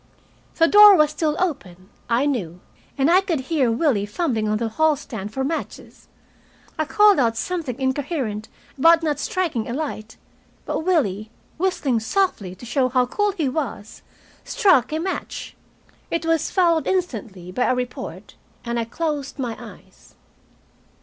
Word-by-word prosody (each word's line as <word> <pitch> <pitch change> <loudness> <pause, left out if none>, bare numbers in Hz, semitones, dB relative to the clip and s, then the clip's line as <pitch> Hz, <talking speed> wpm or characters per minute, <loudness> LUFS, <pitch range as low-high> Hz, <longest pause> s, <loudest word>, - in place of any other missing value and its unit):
The 330 - +4
door 415 +1 +9
was 305 -3 +3
still 305 0 -1
open, 200 - -4 0.2
I 240 +4 +2
knew, 190 - -2 0.4
and 270 0 +2
I 370 +2 +6
could 345 -6 -1
hear 265 -4 +1
Willie 225 -5 +1
fumbling 220 -3 -1
on 215 - +1
the 230 +1 -2
hall 315 +7 +2
stand 220 -8 -7
for 265 +4 -3
matches. 320 +4 -6 0.7
I 310 - -1
called 415 +3 +5
out 230 -3 +1
something 305 -6 -3
incoherent 260 -5 -2 0.3
about 330 +3 +5
not 300 -3 -1
striking 320 -13 -2
a - - -3
light; 250 -7 -5 0.5
but - - -2
Willie, 235 - 0 0.3
whistling 305 -10 0
softly 220 - -1
to 215 - -12
show 255 +1 +1
how 255 0 +2
cool 415 +10 0
he 325 -7 -1
was, 255 -6 -4 0.4
struck 380 - +3
a 310 - -1
match. 370 +4 -5 0.5
It 335 -1 -2
was 330 -2 +1
followed 335 -4 +2
instantly 220 - -3
by 245 +7 0
a 255 - +2
report, 250 0 -6 0.3
and 235 0 -2
I 230 - -1
closed 295 +3 -4
my 245 -4 -3
eyes. - - -15
275 Hz, 155 wpm, -22 LUFS, 230-330 Hz, 0.7 s, door